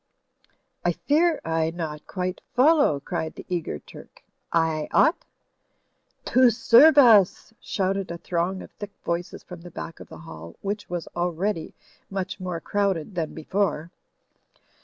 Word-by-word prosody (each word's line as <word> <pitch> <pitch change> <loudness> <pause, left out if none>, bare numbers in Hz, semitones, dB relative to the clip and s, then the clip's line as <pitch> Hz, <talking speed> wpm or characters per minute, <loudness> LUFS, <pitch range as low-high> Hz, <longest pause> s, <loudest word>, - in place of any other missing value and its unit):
"I - - +2
fear 315 +2 +2
I 160 0 0
not 160 -3 -6
quite 185 -1 -3
follow," 280 - +4
cried 160 +2 -4
the - - -10
eager 170 - -2
Turk. - - -15 0.3
"I 160 -2 +1
ought?" 320 +3 +3 1.0
"To 255 0 +5
serve 240 +7 +6
us," 220 -6 +5
shouted 195 -1 -2
a 170 - -5
throng 175 +2 -2
of - - -13
thick 205 -1 -9
voices 170 +1 -3
from 180 -1 -10
the 175 - -10
back 165 -1 -8
of - - -11
the - - -10
hall, 85 - -11
which 205 +1 -4
was 175 -2 -4
already 175 +1 -2 0.3
much 195 0 -4
more 180 -2 -4
crowded 195 -2 -1
than 165 -3 -3
before. 175 -1 -1
180 Hz, 140 wpm, -25 LUFS, 165-205 Hz, 1.0 s, serve